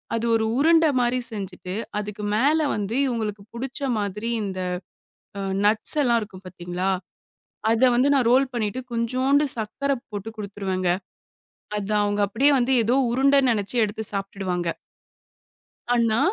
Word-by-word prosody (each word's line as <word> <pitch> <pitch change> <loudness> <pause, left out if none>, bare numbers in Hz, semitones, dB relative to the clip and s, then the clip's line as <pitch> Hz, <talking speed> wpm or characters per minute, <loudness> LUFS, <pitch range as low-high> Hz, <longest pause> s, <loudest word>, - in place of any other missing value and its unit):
அது 230 - -1
ஒரு 220 0 +1
உருண்ட 325 +2 +5 0.2
மாதிரி 245 +1 +1
செஞ்சுட்டு, 190 -3 -6 0.2
அதுக்கு 210 0 -6
மேல 290 +7 +3 0.2
வந்து 210 +3 -3
இவங்களுக்கு 215 -4 -3
புடிச்ச 265 +4 -5 0.2
மாதிரி 210 +3 -3
இந்த 190 -2 -4 0.8
அ, - - -3 0.3
நட்ஸ் 215 +8 +2
எல்லாம் 235 -2 +3
இருக்கும் 195 -2 -10
பாத்தீங்களா? 180 +1 -3 0.8
அதை 240 +3 +4
வந்து 265 +4 +3
நான் 250 -4 +3
ரோல் 265 +2 +5
பண்ணிட்டு, 230 +1 -2
கொஞ்சோண்டு 255 +5 +2
சர்க்கரை 275 +6 -1
போட்டு 205 +1 -5
குடுத்துருவேங்க. 195 -3 -2 0.9
அது 205 +1 -2
அவங்க 205 0 0
அப்படியே 270 +8 +3
வந்து 250 +2 +1
ஏதோ 240 +4 +2 0.2
உருண்டை 275 +3 +4
நினைச்சு 205 +1 -2
எடுத்துச் 215 0 -3
சாப்ட்டுடுவாங்க. 190 -3 -2 1.2
அன்னா, 230 -1 +2
220 Hz, 130 wpm, -24 LUFS, 200-255 Hz, 1.2 s, உருண்ட